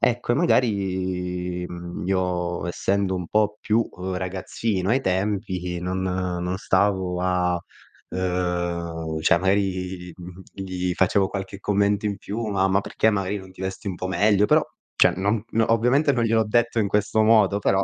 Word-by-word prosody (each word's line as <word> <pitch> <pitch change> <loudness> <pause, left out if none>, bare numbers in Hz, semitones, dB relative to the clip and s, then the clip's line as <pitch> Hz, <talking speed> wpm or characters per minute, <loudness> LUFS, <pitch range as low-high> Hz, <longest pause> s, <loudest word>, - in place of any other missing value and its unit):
Ecco 120 0 +1
e - - +2
magari, 95 - 0
mhmm, 85 0 -7
io 90 -2 -1
essendo 95 +2 0
un 90 -2 -3
po' 105 +1 +1
più 110 +1 +1 0.3
ragazzino 95 +2 -2
ai 130 +3 +3
tempi 95 -3 -1
non 90 +1 -2
non 90 -1 -2
stavo 95 -2 +1
a 90 -1 +1 0.5
ehm, 85 -3 -2
cioè 80 +1 +4
magari, 95 -1 -1
mhmm, 90 +1 -10
gli 90 -2 -3
facevo 95 +1 +2
qualche 95 0 -6
commento 100 +1 +1
in 100 -1 -1
più: 110 +3 -4
"Ma 95 -2 +1
ma 95 0 +3
perché 110 - +1
magari 100 -1 -1
non 95 -1 -11
ti 95 - -12
vesti 95 +1 -4
un 95 - -3
po' 95 - -4
meglio?" 100 +1 +3
Però - - +4 0.3
cioè - - +5
non 100 +3 0 0.2
ovviamente 125 +6 +3
non 120 -2 +1
gliel'ho 115 -1 +2
detto 115 +2 +1
in 105 - +2
questo 105 +2 +1
modo, 110 -2 +4
però. 95 -1 +2
95 Hz, 160 wpm, -24 LUFS, 90-105 Hz, 0.5 s, cioè